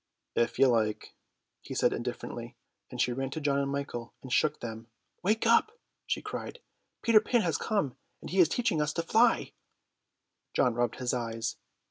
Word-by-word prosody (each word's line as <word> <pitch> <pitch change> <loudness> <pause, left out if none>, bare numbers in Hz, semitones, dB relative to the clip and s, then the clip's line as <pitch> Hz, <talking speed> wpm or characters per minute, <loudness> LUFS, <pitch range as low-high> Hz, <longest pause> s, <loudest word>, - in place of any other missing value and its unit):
"If 120 - +1
you 135 - +6
like," 110 -4 +1 0.5
he - - -7
said - - +3
indifferently, - - -5 0.3
and - - -8
she 125 - +2
ran 135 +1 -2
to 150 - -4
John 140 -2 +1
and 140 0 -1
Michael 140 -4 -4
and 130 -2 -5
shook 150 +2 +2
them. 115 -1 -7 0.3
"Wake 215 +5 +1
up," 435 - +4 0.3
she - - -1
cried, - - -5 0.5
"Peter 225 -3 +6
Pan 235 +2 +2
has 170 -5 0
come 200 - 0 0.2
and - - -9
he 190 - +1
is 170 -4 +7
to 245 - -1
teach 230 - +3
us 150 0 0
to 165 - -1
fly." 230 +7 +3 1.0
John 125 - +3
rubbed 120 -1 0
his 125 -1 -2
eyes. 115 -1 -2
140 Hz, 180 wpm, -30 LUFS, 120-200 Hz, 1.0 s, is